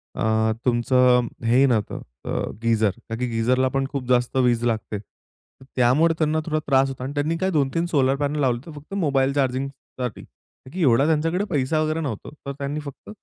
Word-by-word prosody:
अ, 110 Hz, 0 st, +1 dB
तुमचं 125 Hz, 0 st, +3 dB, 0.2 s
हे 115 Hz, +2 st, +3 dB
ही 135 Hz, -, +6 dB
नव्हतं 115 Hz, -6 st, 0 dB, 0.3 s
अ, -, -, -5 dB, 0.3 s
गीझर. 110 Hz, -3 st, +2 dB, 0.2 s
ता 115 Hz, -, -2 dB
की 125 Hz, -, -1 dB
गीझरला 125 Hz, +3 st, +1 dB
पण 135 Hz, 0 st, +1 dB
खूप 135 Hz, -3 st, -4 dB
जास्त 125 Hz, 0 st, +2 dB
वीज 120 Hz, -2 st, +2 dB
लागते. 110 Hz, -2 st, -1 dB, 0.8 s
त्यामुळे 135 Hz, +7 st, +4 dB
त्यांना 155 Hz, 0 st, +1 dB
थोडा 155 Hz, -1 st, 0 dB
त्रास 135 Hz, -1 st, +3 dB
होतो 130 Hz, -1 st, -7 dB
आणि 135 Hz, +2 st, -4 dB
त्यांनी 150 Hz, +3 st, 0 dB
काय 190 Hz, -, +2 dB
2-3 150 Hz, +1 st, +1 dB
सोलार 135 Hz, -6 st, +2 dB
पॅनल 145 Hz, +1 st, -1 dB
लावले 125 Hz, -3 st, +1 dB
तर 165 Hz, -, -9 dB
फक्त 145 Hz, +6 st, -11 dB
मोबाईल 140 Hz, -8 st, +1 dB
चार्जिंगसाठी. 130 Hz, -3 st, -3 dB
ता 130 Hz, -, -21 dB
की 185 Hz, -, -3 dB
एवढा 135 Hz, -2 st, +4 dB
त्यांच्याकडे 165 Hz, +4 st, +1 dB
पैसा 150 Hz, -1 st, 0 dB
वगैरे 155 Hz, +1 st, 0 dB
नव्हता. 130 Hz, -9 st, -5 dB, 0.2 s
तर 140 Hz, -, -3 dB
त्यांनी 140 Hz, +2 st, -3 dB
फक्त 140 Hz, -3 st, -10 dB
135 Hz, 185 wpm, -23 LUFS, 125-150 Hz, 0.8 s, ही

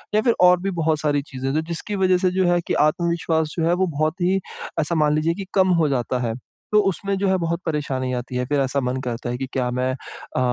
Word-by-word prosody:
या 215 Hz, -, +4 dB
फिर 235 Hz, 0 st, +2 dB
और 180 Hz, 0 st, +6 dB
भी 195 Hz, 0 st, -1 dB
बहुत 155 Hz, -1 st, +1 dB
सारी 145 Hz, -2 st, +1 dB
चीज़ें 135 Hz, +1 st, -3 dB
तो 155 Hz, -, +1 dB
जिसकी 170 Hz, +5 st, -3 dB
वज़ह 185 Hz, -1 st, +3 dB
से 180 Hz, 0 st, +1 dB
जो 185 Hz, -, +4 dB
है, 175 Hz, 0 st, +2 dB
कि -, -, -3 dB
आत्मविश्वास 160 Hz, 0 st, +1 dB
जो 165 Hz, -, +1 dB
है 175 Hz, -, +3 dB
वो 185 Hz, +1 st, +1 dB
बहुत 155 Hz, +3 st, -1 dB
ही 190 Hz, +2 st, +2 dB, 0.4 s
ऐसा 165 Hz, +2 st, 0 dB
मान 150 Hz, -1 st, +3 dB
लीजिए 160 Hz, +2 st, +1 dB
कि 195 Hz, +1 st, -6 dB
कम 190 Hz, -1 st, +4 dB
हो 150 Hz, -, +2 dB
जाता 125 Hz, -1 st, -1 dB
है। 115 Hz, -, -1 dB, 0.4 s
तो 210 Hz, -, +7 dB
उसमें 195 Hz, +3 st, -2 dB
जो 195 Hz, 0 st, 0 dB
है 190 Hz, 0 st, +3 dB
बहुत 170 Hz, 0 st, -1 dB
परेशानी 135 Hz, -5 st, -2 dB
आती 125 Hz, 0 st, -4 dB
है, 125 Hz, -, 0 dB
फिर 145 Hz, +1 st, 0 dB
ऐसा 135 Hz, +1 st, 0 dB
मन 125 Hz, +1 st, -1 dB
करता 120 Hz, 0 st, -3 dB
है 120 Hz, -, -2 dB
कि, 135 Hz, -, -3 dB
क्या 125 Hz, -2 st, 0 dB
मैं 125 Hz, +1 st, 0 dB
अ, 130 Hz, -, -7 dB
160 Hz, 255 wpm, -22 LUFS, 135-180 Hz, 0.4 s, तो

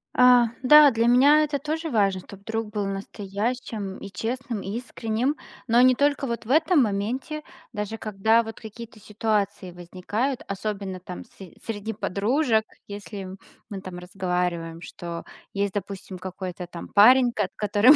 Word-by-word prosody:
А, 250 Hz, -2 st, +6 dB
да, 295 Hz, +2 st, +8 dB
для 230 Hz, 0 st, +1 dB
меня 285 Hz, +5 st, +6 dB
это 290 Hz, -1 st, -1 dB
тоже 315 Hz, +3 st, -3 dB
важно, 200 Hz, -6 st, +2 dB
чтоб 200 Hz, +1 st, -13 dB
друг 225 Hz, +1 st, -3 dB
был 210 Hz, -1 st, -2 dB
настоящим 200 Hz, +1 st, -4 dB
и 200 Hz, -, -9 dB
честным, 230 Hz, +2 st, -3 dB
и 200 Hz, +4 st, -4 dB
искренним, 245 Hz, +2 st, -2 dB, 0.3 s
но 235 Hz, +2 st, +5 dB
не 255 Hz, 0 st, +6 dB
только 285 Hz, +1 st, +1 dB
вот 235 Hz, -1 st, -4 dB
в 240 Hz, -, -4 dB
этом 315 Hz, -1 st, +5 dB
моменте, 245 Hz, +9 st, -2 dB, 0.3 s
даже 210 Hz, +1 st, -4 dB
когда 220 Hz, +2 st, +2 dB
вот 225 Hz, -1 st, -8 dB
какие-то 225 Hz, 0 st, -10 dB
ситуации 205 Hz, -3 st, -1 dB
возникают, 185 Hz, +9 st, -3 dB
особенно 195 Hz, -1 st, -4 dB
там 180 Hz, 0 st, -8 dB
с -, -, -26 dB, 0.3 s
среди 220 Hz, 0 st, -4 dB
подружек, 220 Hz, -, +1 dB, 0.2 s
если, 200 Hz, -1 st, -7 dB, 0.4 s
мы 200 Hz, -3 st, -6 dB
там 185 Hz, -1 st, -8 dB
разговариваем, 180 Hz, -2 st, -2 dB
что 170 Hz, -1 st, -7 dB, 0.3 s
есть, 200 Hz, -1 st, -1 dB
допустим, 195 Hz, -2 st, -6 dB
какой-то 185 Hz, -1 st, -6 dB
там 175 Hz, -1 st, -9 dB
парень, 245 Hz, +4 st, +6 dB
кот 205 Hz, -3 st, 0 dB
которому 210 Hz, +7 st, +5 dB
215 Hz, 150 wpm, -25 LUFS, 195-245 Hz, 0.4 s, да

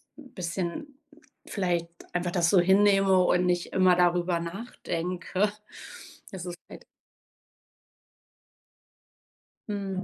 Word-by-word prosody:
bisschen 195 Hz, -, -5 dB, 0.5 s
vielleicht 175 Hz, -4 st, -1 dB, 0.2 s
einfach 175 Hz, 0 st, -1 dB
das 170 Hz, -1 st, +2 dB
so 190 Hz, -, +5 dB
hinnehme 195 Hz, 0 st, +4 dB
und 180 Hz, 0 st, +2 dB
nicht 175 Hz, -1 st, -1 dB
immer 185 Hz, -1 st, +5 dB
darüber 175 Hz, 0 st, +2 dB
nachdenke. 180 Hz, 0 st, -3 dB, 0.8 s
Das 185 Hz, -2 st, -7 dB
ist 175 Hz, -1 st, -6 dB
halt -, -, -12 dB, 2.8 s
Mhm. 195 Hz, -2 st, -3 dB
180 Hz, 90 wpm, -27 LUFS, 175-195 Hz, 2.8 s, so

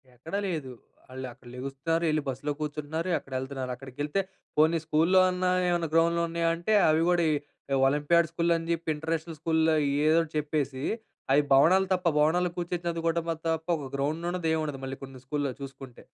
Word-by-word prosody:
ఎక్కడ 160 Hz, +10 st, -7 dB
లేదు. 155 Hz, -8 st, -3 dB, 0.4 s
వాళ్ళు 130 Hz, 0 st, -6 dB
అక్కడ 125 Hz, 0 st, -19 dB
లెగుస్తున్నారు, 135 Hz, +6 st, -2 dB
ఎళ్లి 155 Hz, 0 st, +1 dB
బస్సులో 135 Hz, +3 st, -3 dB
కూర్చుంటున్నారు, 150 Hz, +3 st, -3 dB
అక్కడ 135 Hz, -, -13 dB
ఎళ్తున్నారు, 130 Hz, -1 st, -4 dB
అక్కడికి 130 Hz, +1 st, -13 dB
ఎళ్తే, 175 Hz, +7 st, 0 dB, 0.4 s
పోనీ 160 Hz, +2 st, +5 dB
స్కూల్‌లో, 165 Hz, +5 st, +4 dB
అన్న 180 Hz, 0 st, -3 dB, 0.2 s
ఏమన్నా 170 Hz, -2 st, +1 dB
గ్రౌండ్లు 170 Hz, +1 st, +3 dB
ఉన్నాయా 165 Hz, 0 st, 0 dB
అంటే, 175 Hz, +6 st, -1 dB, 0.2 s
అవి 155 Hz, +1 st, +3 dB
గూడా 175 Hz, -1 st, +3 dB
ఈ -, -, +2 dB, 0.5 s
ఒలింపియాడ్ 155 Hz, +4 st, +3 dB
స్కూల్ 170 Hz, 0 st, 0 dB
అని 165 Hz, 0 st, -4 dB
జేప్పి, 170 Hz, -1 st, -2 dB
ఇంటర్నేషనల్ 160 Hz, +1 st, -3 dB
స్కూల్‌లో 160 Hz, 0 st, +2 dB, 0.3 s
ఏదోటి 165 Hz, 0 st, +3 dB
చెప్పేసి, 145 Hz, -3 st, -2 dB, 0.5 s
అవి 145 Hz, -, +6 dB
భవనాలు 185 Hz, +8 st, +5 dB
తప్ప, 180 Hz, -1 st, -2 dB
భవనాలు 175 Hz, +4 st, +3 dB
కూర్చొని 175 Hz, 0 st, -3 dB
చదువుకోవడంలో 165 Hz, 0 st, -1 dB
తప్ప, 160 Hz, +1 st, -2 dB
ఒక 140 Hz, -3 st, -6 dB
గ్రౌండ్ 155 Hz, +5 st, -1 dB
ఉండదు. 175 Hz, -2 st, -2 dB
ఏం 160 Hz, -, +1 dB
ఉండదు. 145 Hz, -3 st, -4 dB
మళ్ళీ 135 Hz, 0 st, -5 dB
కొన్ని 135 Hz, -1 st, -9 dB
స్కూల్‌లో 145 Hz, -1 st, -1 dB
చూసుకుంటే. 135 Hz, -2 st, -9 dB
160 Hz, 170 wpm, -28 LUFS, 140-170 Hz, 0.5 s, అవి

